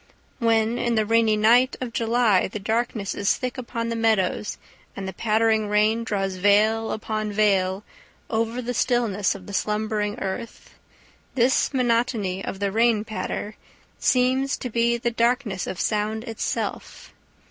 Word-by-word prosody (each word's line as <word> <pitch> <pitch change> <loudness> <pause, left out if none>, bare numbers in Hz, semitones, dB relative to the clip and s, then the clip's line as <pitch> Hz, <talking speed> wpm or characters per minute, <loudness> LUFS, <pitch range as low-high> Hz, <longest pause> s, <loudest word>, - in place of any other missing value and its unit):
When 230 0 +2
in 235 -1 0
the 215 -1 +2
rainy 225 -1 +3
night 240 +5 +4
of 245 -3 -5
July 230 -4 +2
the 200 - -6
darkness 220 0 -2
is 200 - +1
thick 250 -1 -4
upon 230 -1 -4
the 230 - -2
meadows 220 -3 0 0.4
and 195 -1 -5
the 190 - -5
pattering 220 -1 +1
rain 215 +2 +2
draws 195 -4 -2
veil 215 +3 +3
upon 215 -1 -3
veil 195 -2 +1 0.4
over 230 +2 -1
the 245 +1 -3
stillness 225 -6 +1
of 190 -2 -10
the 200 - -9
slumbering 210 0 -1
earth, 195 +4 -6 0.6
this 255 +1 +2
monotony 230 -7 0
of - - -5
the 200 -1 -1
rain 225 0 +2
patter 215 -1 -5 0.4
seems 260 +2 +2
to 250 - -6
be 235 +1 +2
the 235 0 -1
darkness 235 -4 0
of 185 - -5
sound 215 +1 -1
itself. 225 -2 -4
220 Hz, 145 wpm, -24 LUFS, 210-235 Hz, 0.6 s, night